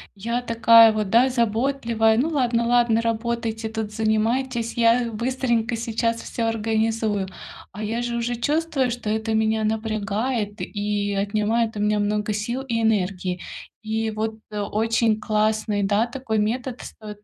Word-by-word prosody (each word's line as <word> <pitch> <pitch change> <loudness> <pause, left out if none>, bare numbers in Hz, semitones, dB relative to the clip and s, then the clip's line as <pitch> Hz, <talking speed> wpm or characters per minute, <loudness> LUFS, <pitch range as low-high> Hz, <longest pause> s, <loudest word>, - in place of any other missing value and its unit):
я 235 +5 -2
такая 230 -1 +6
вот, 215 -2 -2
да, 235 +5 +5
заботливая: 235 -1 +1
"Ну 275 +7 +1
ладно, 245 -6 +1
ладно, 240 -2 +3
работайте 230 0 -2
тут, 220 -1 -4
занимайтесь, 225 +3 0
я 235 0 +3
быстренько 235 0 -1
сейчас 230 0 -1
всё 230 -1 -3
организую". 220 -2 0 0.5
А 210 +3 -6
я 225 +3 -2
же 240 0 -2
уже 235 +1 -1
чувствую, 290 -1 0
что 235 -3 -4
это 220 +1 -1
меня 220 0 +1
напрягает 215 0 -2
и 205 -1 -2
отнимает 215 +3 0
у 205 - -3
меня 210 0 +2
много 210 +1 0
сил 225 +5 -2
и 235 -4 -2
энергии. 185 -4 0 0.4
И 220 0 -1
вот, 220 +1 -3 0.2
э, 210 - -4
очень 220 +2 +1
классный, 215 -1 0
да, 205 +4 +2
такой 240 -3 -2
метод, 245 +4 -2
стоит 210 -1 -10
225 Hz, 145 wpm, -23 LUFS, 215-235 Hz, 0.5 s, такая